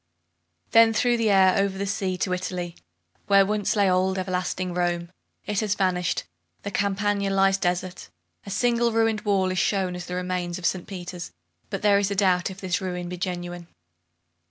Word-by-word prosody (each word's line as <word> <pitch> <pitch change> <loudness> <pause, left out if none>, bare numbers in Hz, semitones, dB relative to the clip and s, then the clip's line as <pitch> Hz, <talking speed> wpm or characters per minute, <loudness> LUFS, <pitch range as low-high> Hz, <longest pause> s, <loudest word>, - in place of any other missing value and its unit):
Then 225 0 +6
through 240 +1 +2
the 225 -2 +1
air, 190 -2 +5
over 195 -1 +1
the 200 - -2
sea, 195 -2 -2
to 185 0 -1
Italy, 180 -1 -4 0.5
where 195 -1 +6
once 210 +2 0
lay 200 -2 +3
old, 185 +1 +2
everlasting 185 -1 -2
Rome. 175 -1 -1 0.3
It 210 -2 -1
has 210 -2 0
vanished! 180 -3 0 0.4
The 200 - -4
Campagna 200 0 0
lies 195 0 +3
desert. 180 0 -2 0.3
A - - -9
single 235 +3 +1
ruined 225 -1 +1
wall 195 -4 +1
is 185 - -1
shown 190 -1 +1
as 180 0 -7
the 180 - -4
remains 180 -1 -2
of 180 - -7
St. 185 -2 -1
Peter's, 180 - -7 0.4
but - - -4
there 200 -1 +5
is 200 -1 0
a 200 - -2
doubt 185 -2 +2
if 190 0 -9
this 185 0 -1
ruin 180 -2 -4
be 180 - -5
genuine. 175 -1 -5
190 Hz, 180 wpm, -25 LUFS, 180-200 Hz, 0.5 s, Then